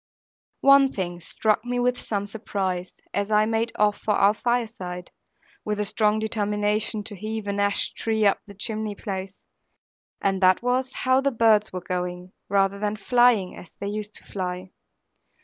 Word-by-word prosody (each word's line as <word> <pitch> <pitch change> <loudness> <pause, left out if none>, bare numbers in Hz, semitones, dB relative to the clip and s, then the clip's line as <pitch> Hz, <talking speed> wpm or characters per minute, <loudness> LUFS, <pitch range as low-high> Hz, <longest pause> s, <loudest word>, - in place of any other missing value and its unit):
One 275 -1 +6
thing 175 -3 -4
struck 215 +5 0
me 245 0 -2
with 245 0 +1
some 205 -2 -2
surprise, 195 -4 -3 0.2
as 200 +1 -1
I 215 0 +4
made 225 +1 0
off 210 -1 +2
for 210 - 0
our 200 +1 +5
fireside 215 -7 -3 0.5
(with 210 -1 -2
a 210 - +1
strong 215 +1 +2
determination 210 0 0
to 205 - -8
heave 215 +2 -4
an 200 0 -2
ash 200 0 +1
tree 220 -1 0
up 200 - +4
the 200 - -12
chimney 215 0 -3
place), 195 -1 -6 0.8
and 195 -1 0
that 185 +4 +4
was 255 +1 0
how 260 +1 +4
the 275 - +2
birds 220 -4 +3
were 185 - -5
going, 180 -1 -3 0.2
rather 195 0 +2
than 210 0 -1
flying 235 -3 +3
as 175 - -13
they 200 - -5
used 210 0 -5
to - - -9
fly. 185 -1 -5
210 Hz, 165 wpm, -25 LUFS, 195-225 Hz, 0.8 s, One